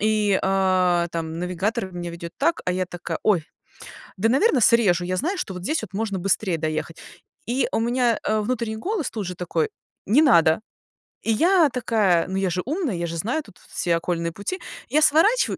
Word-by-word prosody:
и, 210 -2 +2
а, 185 -2 +2
там 165 -1 -4
навигатор 185 +2 -2
меня 175 -1 -5
ведёт 170 0 -7
так, 335 - +1
а 180 - 0
я 185 0 -1
такая: 175 -1 -5
"Ой, 190 -7 +2 0.7
да, 215 +4 +1
наверно, 270 - +3
срежу". 205 -7 +4
Я 185 +1 -2
знаю, 340 - -1
что 200 - -4
вот 180 - -7
здесь 315 +9 0
вот 180 - -8
можно 200 -1 -2
быстрее 190 0 0
доехать, 155 +1 -3 0.5
и 245 +4 0
у - - +1
меня, 240 0 +1
а, 215 - 0
внутренний 230 -1 -2
голос 360 - -2
тут 210 -4 -4
же 180 - -4
такой: 170 -3 -1 0.4
"Не 245 +10 +5
надо". 165 - +5 0.6
И 225 - 0
я 335 - +4
такая: 220 -9 +1
"Но 190 +1 -3
я 195 -1 +1
же 180 +1 -1
умная". 295 - -2
Я 170 0 -2
же 165 0 -5
знаю 240 - -1
тут 180 - -18
все 170 -1 0
окольные 170 0 -2
пути, 205 - -5 0.3
я 305 - +3
сворачиваю, 325 +11 +4
195 Hz, 195 wpm, -23 LUFS, 175-245 Hz, 0.7 s, Не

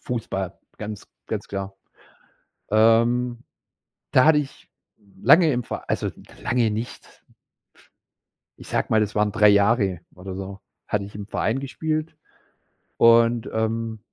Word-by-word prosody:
Fußball, 95 -7 -4 0.2
ganz, 105 -1 -7 0.2
ganz - - -4
klar. 95 0 -5 1.0
Ähm, 115 +2 +3 0.7
da 130 - +5
hatte 155 -1 +6
ich 140 - -8 0.5
lange 155 - +6
im 125 -1 -1
Ver - - -7
also - - 0 0.3
lange 120 -3 +1
nicht 110 +3 -7 1.4
ich - - -12
sage - - -1
mal, 110 - +4
das 105 0 -1
waren 105 0 +2
drei 105 0 +5
Jahre 100 -3 +3
oder 95 +1 -8
so, 95 +1 -7 0.3
hatte 100 -1 -1
ich 100 - -12
im 100 0 -7
Verein 120 +4 -1
gespielt. 155 +3 -3 0.8
Und, 115 0 +4
ähm 110 0 -2
110 Hz, 125 wpm, -23 LUFS, 100-120 Hz, 1.4 s, hatte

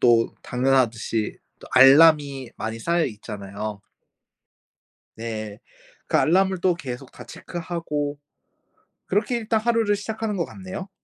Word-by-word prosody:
또 115 -2 +4
당연하듯이 125 -4 0 0.2
또 - - -13
알람이 140 -1 +6
많이 110 +1 -4
쌓여있잖아요. 105 - -3 1.4
네. 110 -2 -5 0.5
그 - - +1
알람을 190 +2 +3
또 180 -1 +3
계속 135 -5 -7
다 125 - -11
체크하고 150 -1 -4 0.9
그렇게 220 +5 0
일단 220 -1 0
하루를 225 -2 +2
시작하는 215 +1 -4
것 170 - 0
같네요. 190 0 -8
145 Hz, 255 characters per minute, -24 LUFS, 115-190 Hz, 1.4 s, 알람이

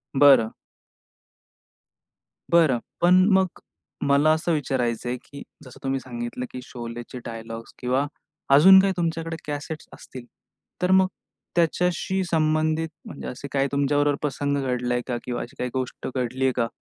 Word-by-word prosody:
बरं. 135 -5 +6 2.0
बरं. 160 -8 +4 0.2
पण 175 +1 +6 0.2
मग 190 -2 +2 0.5
मला 140 +2 +4
असं 160 +2 -1
विचारायच 125 -6 -1
आहे 120 +1 -1
की 140 +3 -12 0.2
जसं 130 - -13
तुम्ही 135 0 0
सांगितलं, 120 0 -5
की 125 - -6
शोलेचे 120 0 -7
डायलॉग्स 115 0 -7
किंवा 130 +3 +1 0.5
अजून 190 +7 +9
काही 195 0 +3
तुमच्याकडे 165 -1 -2
कॅसेट्स 150 +1 -5
असतील. 125 -2 -11 0.6
तर 180 +1 +2
मग 190 0 +5 0.5
त्याच्याशी 180 +2 +1
संबंधित 155 0 +1 0.2
म्हणजे - - -8
असे 130 +3 -6
काही 140 0 +1
तुमच्याबरोबर 145 +1 +2
प्रसंग 145 -1 -1
घडलाय 125 -1 -1
का? 120 -2 -1
किंवा 120 -1 -3
अशी 120 - -9
काही 125 - -1
गोष्ट 130 -1 -4
घडली 130 +1 -1
आहे 130 - +4
का? 115 -2 +1
140 Hz, 140 wpm, -24 LUFS, 125-160 Hz, 2.0 s, अजून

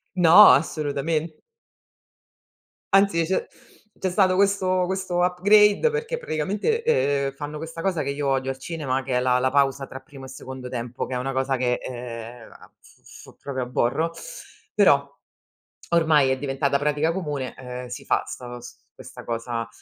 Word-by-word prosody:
No, 180 +4 +8
assolutamen 155 +1 -2 1.6
Anzi, 195 -4 +4
c'è 185 +3 -1 0.5
c'è 190 - -1
stato 185 0 +3
questo 190 -2 +2
questo 190 -2 -2
upgrade 205 - +4
perché 460 +1 -3
praticamente, 205 - -1
ehm, 140 - +1
fanno 150 +1 -7
questa 165 +1 -7
cosa 185 -4 0
che - - -4
io 140 0 -2
odio 135 -1 0
al 130 - -8
cinema, 135 -4 -3
che 130 -1 -4
è - - +3
la 125 0 +2
la 130 +1 +1
pausa 140 -1 +1
tra 130 - -9
primo 135 0 -12
secondo 130 -1 -9
tempo, 120 0 -4
che 130 - -7
è - - -1
una 135 +2 -3
cosa 135 0 0
che, 125 -1 0
ehm, 120 -2 -8
a - - -17
f - - -22
f - - -14
proprio 130 -2 -4
aborro, 125 +6 0 0.6
però 140 -9 +4 0.8
ormai 155 -5 +4
è 130 - 0
diventata 140 0 0
pratica 150 +2 +1
comune, 145 -9 -4
ehm, 125 -1 -7
si 120 - -8
fa - - +1
'sta 120 -1 -8
s 120 - -12 0.2
questa - - -11
cosa. 115 0 -3
140 Hz, 160 wpm, -24 LUFS, 130-180 Hz, 1.6 s, No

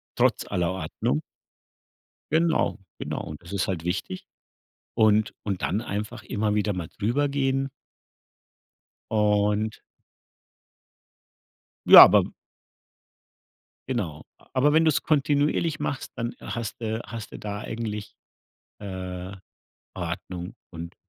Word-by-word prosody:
trotz - - +2
aller 90 0 0
Ordnung. 80 -5 -2 1.1
Genau, 165 +1 +2 0.2
genau. - - -4
Und 75 -1 -8
das 85 +3 -10
ist 100 - 0
halt 90 -4 -2
wichtig. 95 +1 -3 0.7
Und 110 0 +3
und 100 -3 -3
dann 105 +6 0
einfach 105 0 -4
immer 105 0 -1
wieder 105 0 +1
mal 90 -4 -4
drüber 120 +7 +1
gehen 135 -1 0 1.4
und 105 0 +2 2.1
Ja, - - +13
aber - - +6 1.6
Genau. 90 - -2
A - - -24
Aber 140 +3 +4
wenn 160 +1 +5
du's 155 - +2
kontinuierlich 150 +1 +1
machst, 135 - -3
dann 115 0 -3
hast 120 0 -5
du 110 0 -2
hast 110 0 -7
du - - -8
da 105 -1 -4
eigentlich, 110 -2 -5 0.7
äh, 95 -1 -6 0.6
Ordnung 90 0 -5 0.2
und 85 0 -8
105 Hz, 110 wpm, -26 LUFS, 95-120 Hz, 2.1 s, Ja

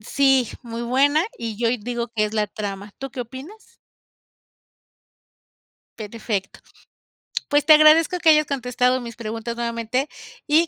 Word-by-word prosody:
Sí, 270 +1 +2
muy 235 -1 -6
buena. 280 +6 +2
Y 225 -3 -5
yo 235 -1 +1
ahí 245 - +1
digo 240 +1 -4
que 220 -2 0
es 210 - -4
la 210 -1 +1
trama. 205 -1 -6
¿Tú 270 0 -6
qué 265 -1 -6
opinas? 265 - -9 2.4
Perfecto. 215 -2 -4 0.9
Pues, 290 0 +2
te 310 - +8
agradezco 310 +4 +6
que 335 -2 +4
hayas 305 -1 +5
contestado 250 -2 0
mis 235 -1 -8
preguntas 225 +1 -5
nuevamente, 235 +3 -2 0.4
y 320 +3 +4
245 Hz, 140 wpm, -22 LUFS, 225-285 Hz, 2.4 s, te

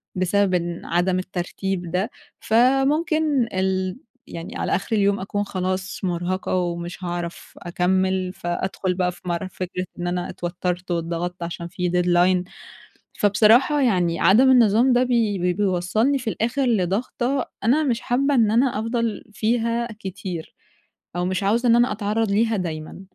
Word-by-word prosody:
بسبب 185 +1 +1
إن 175 -1 -2
عدم 180 +2 +1
الترتيب 185 0 -4
ده، 185 +6 0 0.3
فممكن 270 +3 +2
ال 185 0 -1 0.3
يعني 175 +8 -8
على - - 0
آخر 200 +4 -2
اليوم 200 -1 +2
أكون 205 +2 -2
خلاص 185 -1 -3
مُرهَقة 180 +1 -1
ومش 175 0 -3
هاعرف 175 -1 -5
أكمِّل، 185 +1 0
فأدخل 185 +1 -2
بقى 180 0 0
في 180 - -16
مر 175 +2 -2
فكرة 185 0 -5
إن 175 - -2
أنا 175 0 -2
اتوتّرت 175 +1 -4
واتضغطت 170 +1 -3
عشان 170 0 -5
في 180 +1 -2
deadline 180 +1 +2 0.7
فبصراحة 225 +8 +4
يعني 180 -9 +1
عدم 245 +8 +5
النظام 240 +1 +5
ده 245 +1 +4
بي 230 -5 +1
بي 180 0 +1
بيوصَّلني 205 +7 +1
في 235 - -3
الآخر 240 +6 -1
لضغطه 240 +6 0 0.2
أنا 270 +8 +3
مش 250 -4 0
حابّة 275 +4 +1
إن 225 -4 +4
أنا 240 0 +2
أفضَل 230 -1 -2
فيها 230 +2 0
كتير، 185 -4 -6 0.6
أو 175 - 0
مش 185 +1 -1
عاوزة 230 +5 +2
إن 230 - +6
أنا 240 -1 +3
أتعرّض 210 +1 -1
ليها 220 +2 +2
دايمًا. 160 -3 -5
190 Hz, 145 wpm, -23 LUFS, 180-230 Hz, 0.7 s, إن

